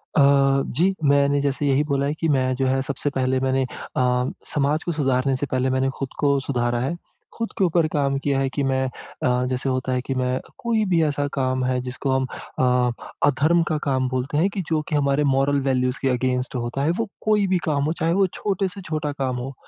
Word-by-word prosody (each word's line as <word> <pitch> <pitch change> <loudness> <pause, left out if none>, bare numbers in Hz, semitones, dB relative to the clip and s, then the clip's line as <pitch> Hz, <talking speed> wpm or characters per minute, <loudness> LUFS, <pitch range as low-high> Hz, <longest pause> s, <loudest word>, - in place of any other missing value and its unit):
अ, 150 - +5 0.5
जी। 180 +9 +2
मैंने 140 0 +3
जैसे 140 +1 0
यही 140 +2 +3
बोला 140 -2 0
है, 145 - 0
कि 160 +1 -2
मैं 130 -2 +2
जो 135 - 0
है 135 0 +1
सबसे 140 +1 -2
पहले 130 0 +1
मैंने 130 0 +1 0.3
अ, 125 0 +2 0.2
समाज 150 +2 +1
को 175 - -2
सुधारने 135 -3 +1
से 135 - -2
पहले 130 0 +1
मैंने 130 +1 +1
खुद 135 - -3
को 140 -1 +3
सुधारा 120 -3 -1
है। 135 +7 -1 0.4
खुद 230 -1 -3
के - - +2
ऊपर 170 -2 +3
काम 140 -2 +1
किया 140 -1 0
है 135 -1 +1
कि, 140 +2 -2
मैं 130 0 +1
अ, 125 0 -2
जैसे 130 +1 -1
होता 130 0 -1
है 125 - 0
कि 135 - -3
मैं 130 0 0
क - - -19
कोई 230 -2 +1
भी 170 -3 +3
ऐसा 145 -1 0
काम 130 -1 0
है 125 0 +1
जिसको 130 +2 -3
हम 130 0 +1 0.3
अ 125 -1 +3 0.3
अधर्म 155 +5 +3
का 155 - 0
काम 130 -2 +1
बोलते 130 +3 -2
हैं 185 +5 +3
कि 195 -1 -3
जो 155 -2 +1
कि 155 - 0
हमारे 140 0 +2
मोरल 140 +1 +2
वैल्यूज 125 -1 0
के 135 - +1
अगेंस्ट 125 +1 -1
होता 120 +3 -2
है। 150 - +2
वो 230 - -1 0.2
कोई 210 -2 +3
भी 185 - +2
काम 145 -4 +1
हो, 155 +3 0
चाहे 165 0 0
वो 195 +1 +4
छोटे 195 +1 -2
से 195 +2 -7
छोटा 155 -4 -3
काम 135 -3 -2
हो, 135 +3 -5
135 Hz, 230 wpm, -23 LUFS, 130-150 Hz, 0.5 s, अ